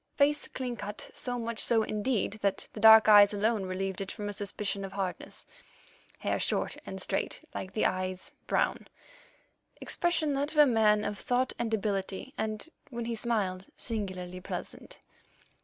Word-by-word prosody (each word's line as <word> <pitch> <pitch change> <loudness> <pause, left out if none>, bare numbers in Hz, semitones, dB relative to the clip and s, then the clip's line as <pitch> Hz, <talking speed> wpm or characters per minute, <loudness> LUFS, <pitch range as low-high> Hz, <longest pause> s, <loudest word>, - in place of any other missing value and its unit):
Face 295 +1 +3
clean 250 -2 -4
cut—so 210 +4 -5
much 230 -1 -4
so, 225 -2 +3
indeed, 215 0 -1
that 200 -1 0
the - - -7
dark 220 +1 +9
eyes 205 -1 +8
alone 210 -1 +1
relieved 190 +1 -3
it 195 - -4
from 210 -2 -5
a - - -4
suspicion 200 0 -3
of 190 0 -6
hardness; 195 -2 -4 0.7
hair - - -1
short - - 0
and - - -5
straight, - - -2
like 190 - -5
the 215 - +1
eyes, 185 0 -1 0.2
brown; - - 0 0.9
expression 325 -4 0
that 285 +3 -1
of - - -8
a 300 - +9
man 215 -4 +3
of 205 -1 -3
thought 250 +1 0
and 235 -2 -1
ability, 200 +3 -2
and, 215 +5 -3 0.2
when 235 -3 -4
he 230 0 -2
smiled, 205 -5 -1
singularly 185 -5 -4
pleasant. - - -7
215 Hz, 155 wpm, -30 LUFS, 195-235 Hz, 0.9 s, dark